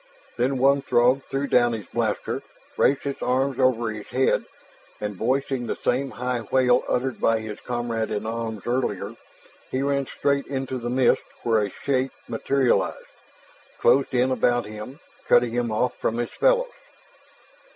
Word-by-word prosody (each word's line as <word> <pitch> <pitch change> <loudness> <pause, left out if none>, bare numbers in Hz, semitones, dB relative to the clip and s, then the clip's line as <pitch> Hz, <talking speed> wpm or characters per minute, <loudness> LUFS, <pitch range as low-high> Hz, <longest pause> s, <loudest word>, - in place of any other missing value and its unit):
Then 130 +3 +1
one 140 +2 +4
Throg 125 +1 +3
threw 135 +1 -2
down 120 -3 +3
his 110 -3 -5
blaster, - - -2 0.3
raised 140 +1 +2
his 140 -1 -4
arms 130 +1 0
over 120 -3 +2
his 105 -1 -8
head, 130 +1 +1 0.5
and 105 -1 -4
voicing 130 +3 -1
the - - -1
same 135 +2 0
high 125 -1 -2
wail 125 -1 +4
uttered 130 0 -1
by 115 - +3
his 110 -1 -7
comrade 120 -2 -2
in 105 0 -3
arms 110 -2 -4
earlier, 125 +2 -1 0.5
he 130 +1 -1
ran 140 -1 0
straight 140 -1 0
into 130 -1 -3
the 120 0 -4
mist 125 0 +3 0.2
where 115 -2 +3
a 105 - -1
shape 130 +5 -1
materialized, 130 +2 +1 0.7
closed 135 0 +3
in 125 +1 +3
behind 120 -1 +2
him, 110 +7 -8 0.3
cutting 120 -1 +4
him 120 -1 -1
off 115 +4 0
from 115 - -1
his 120 - -2
fellows. - - +2
125 Hz, 155 wpm, -24 LUFS, 115-135 Hz, 0.7 s, one